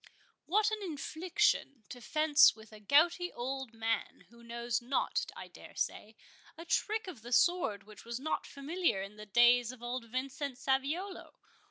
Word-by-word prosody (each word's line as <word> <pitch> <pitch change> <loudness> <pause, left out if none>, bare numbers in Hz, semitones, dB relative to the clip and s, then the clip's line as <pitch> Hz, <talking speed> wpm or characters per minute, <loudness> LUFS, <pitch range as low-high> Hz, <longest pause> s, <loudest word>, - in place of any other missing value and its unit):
"What 425 +4 +3
an 430 -1 -3
infliction—to 315 - -1
fence 305 +4 +5
with 220 -1 -15
a 215 - -11
gouty 330 - +3
old 265 0 -4
man, 225 0 -2
who 235 0 -18
knows 235 +1 -2
not, 250 +3 -1
I - - -8
dare - - -14
say, 220 +1 -3 0.4
a 335 - -9
trick 435 +5 0
of 345 - -9
the 240 +2 -10
sword 250 - +2
which 210 0 -14
was 235 +1 -5
not 315 +4 -2
familiar 285 - -1
in 200 +2 -10
the 210 0 -10
days 240 +2 +5
of 250 -2 -13
old 240 0 -4
Vincent 260 +2 -4
Saviolo! 280 +8 -2
260 Hz, 160 wpm, -32 LUFS, 235-325 Hz, 0.4 s, fence